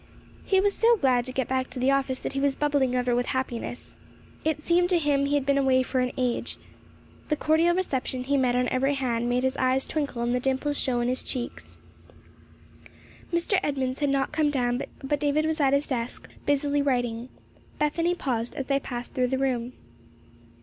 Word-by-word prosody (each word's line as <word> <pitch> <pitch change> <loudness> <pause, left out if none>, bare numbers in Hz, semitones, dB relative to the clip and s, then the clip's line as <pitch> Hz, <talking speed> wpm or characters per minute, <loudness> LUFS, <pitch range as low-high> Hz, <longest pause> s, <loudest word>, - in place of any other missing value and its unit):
He 385 - +3
was 400 +1 +2
so 465 +2 +4
glad 255 - +2
to 255 - -3
get 260 0 -1
back 260 0 -1
to 255 - -10
the 255 +2 +2
office 270 -1 0
that - - -4
he 275 - -1
was 280 -1 +1
bubbling 285 -4 +1
over 250 -1 +1
with 245 +1 0
happiness. 245 -1 -4 0.5
It 315 -1 0
seemed 350 +3 +2
to 360 - +4
him 285 -3 +1
he 290 - +1
had 285 -2 0
been 280 0 +3
away 260 -1 +3
for 255 0 -1
an 250 0 0
age. 250 -2 -1 0.7
The 300 - +2
cordial 320 +3 +3
reception 265 -8 -2
he 280 +2 0
met 255 -3 +2
on 250 0 +2
every 270 +2 +1
hand 240 -3 -1
made 250 +1 +1
his 260 0 +1
eyes 260 +1 +2
twinkle 280 -6 -2
and 240 +1 0
the 250 - +1
dimples 270 +3 -1
show 245 -2 0
in 240 - 0
his 255 +1 0
cheeks. 245 -2 -5 1.5
Mr. 340 +3 +3
Edmunds 265 -5 -2
had 290 -1 +1
not 275 -1 0
come 305 -1 +2
down, 245 -3 0 0.2
but 285 +2 0
David 295 +1 +1
was 315 0 0
at 275 -1 +4
his 280 +1 +2
desk, 240 -3 -4 0.2
busily 285 0 +2
writing. 245 -3 -1 0.5
Bethany 335 +4 +1
paused 240 -7 -2
as 275 - -3
they 275 0 +1
passed 245 -2 -6
through 255 -1 +1
the 265 +1 -1
room. 255 -2 -1
270 Hz, 200 wpm, -26 LUFS, 250-290 Hz, 1.5 s, so